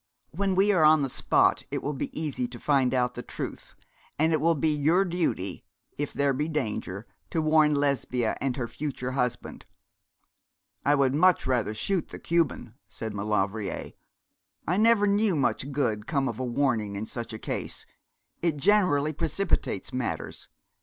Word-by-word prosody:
When 195 +2 0
we 195 +2 +4
are 175 -6 +3
on 155 -1 +6
the 135 - -2
spot - - +2
it - - -3
will 145 - -2
be 135 - -4
easy 145 -6 -2
to 120 -1 -9
find 135 -4 +2
out 125 -1 +1
the 120 - -6
truth; - - -7 0.4
and 160 +2 +3
it 155 - +1
will 165 +1 +3
be 155 +1 +1
your 160 +7 +3
duty, 170 - -2 0.3
if 145 0 -3
there 140 -1 +1
be 145 +4 -1
danger, 110 - -3 0.2
to 165 - -1
warn 155 -1 +4
Lesbia 135 -5 0
and 135 -1 -1
her 120 -3 -2
future 130 -2 -4
husband. 125 -2 -3 1.2
'I 145 - +5
would 135 -2 +2
much 180 +4 +4
rather 120 -4 0
shoot 180 - -1
the - - -8
Cuban,' 165 -9 0
said 110 -2 -6
Maulevrier. 105 0 -2 0.8
'I 180 - +1
never 220 -1 +5
knew 205 -1 +2
much 140 0 0
good 110 -6 -1
come 140 -4 0
of - - -4
a - - -1
warning 120 -5 0
in 100 +2 -3
such 120 +1 -5
a 110 - -5
case: - - -4 0.6
it 165 -3 +1
generally 155 -4 +3
precipitates 160 - -1
matters. 125 -1 -4
140 Hz, 165 wpm, -27 LUFS, 125-160 Hz, 1.2 s, on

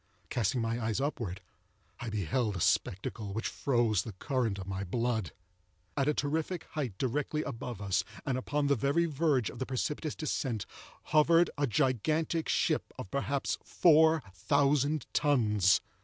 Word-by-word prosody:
Casting 120 +1 +1
my 115 +1 -1
eyes 110 +1 0
upwards, 115 -10 -3 0.6
I 120 - -4
beheld 105 +2 -1
a - - -3
spectacle 100 +4 0
which 110 +3 -2
froze 120 -7 +1
the 110 - -7
current 115 0 -1
of 95 - -6
my 95 0 -3
blood. 115 0 -1 0.6
At 140 -1 +1
a 150 - +3
terrific 160 +4 -1
height 130 -11 -3
directly 145 +5 -1
above 125 -3 -5
us, 95 -2 +1 0.2
and 135 -3 0
upon 145 +3 -1
the 140 - +4
very 140 +7 +2
verge 145 -6 +1
of - - -11
the 130 - -3
precipitous 145 +4 -2
descent, 130 - -2 0.5
hovered 165 +2 +5
a 145 -1 +1
gigantic 155 +6 +1
ship - - +1
of, 95 - -7
perhaps, 140 0 -1
four 160 -2 +5
thousand 140 - +2
tons. 105 - +3
130 Hz, 150 wpm, -31 LUFS, 110-150 Hz, 0.6 s, hovered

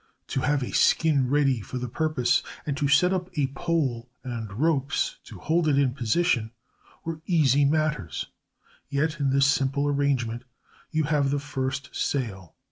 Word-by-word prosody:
To - - -1
have 145 0 +1
a - - -5
skin 145 -6 +3
ready 135 -4 +2
for 115 +6 -6
the 125 0 -3
purpose, 155 -1 +1 0.2
and 145 - -1
to 140 0 0
set 160 +7 +4
up 180 -1 -2
a 145 - +3
pole 135 -9 -1
and 115 -5 -5
ropes 135 +2 0
to - - -11
hold 165 +1 +1
it 145 -2 +3
in 135 -3 +2
position, 120 -1 +1 0.6
were 160 -1 -4
easy 145 -5 +4
matters; 145 - 0 0.6
yet 150 +2 -1
in 140 -2 +1
this 135 +1 +4
simple 140 +1 +1
arrangement 135 -5 0 0.5
you 155 -1 0
have 145 -2 +1
the 145 - +1
first 135 -2 -4
sail. 95 - -3
140 Hz, 160 wpm, -26 LUFS, 125-150 Hz, 0.6 s, set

